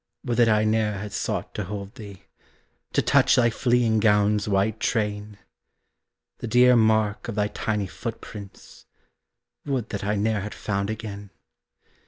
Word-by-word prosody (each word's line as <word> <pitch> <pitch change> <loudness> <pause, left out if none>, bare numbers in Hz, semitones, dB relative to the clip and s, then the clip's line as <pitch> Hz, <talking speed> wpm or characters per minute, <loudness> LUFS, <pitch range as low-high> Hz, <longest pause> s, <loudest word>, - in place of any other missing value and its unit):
Would 120 - -1
that 120 -2 +5
I 105 -1 +3
ne'er 110 0 +1
had 105 +1 -6
sought - - -3
to 105 - -4
hold 100 +1 -6
thee, 100 -6 -11 0.7
To - - +2
touch - - +4
thy 120 -1 +3
fleeing 120 -2 +2
gown's 105 0 +2
white 100 +2 +1
train! 105 -2 -2 1.0
The - - -5
dear 125 +2 +5
mark 110 -2 +2
of 115 - -4
thy 105 0 0
tiny 105 -2 -2
footprints 105 0 -9 0.8
Would 130 -6 -2
that 100 - -4
I 105 +1 0
ne'er 105 0 0
had 105 +2 -6
found 100 -1 -2
again! 105 -2 -6
105 Hz, 150 wpm, -25 LUFS, 105-110 Hz, 1.0 s, that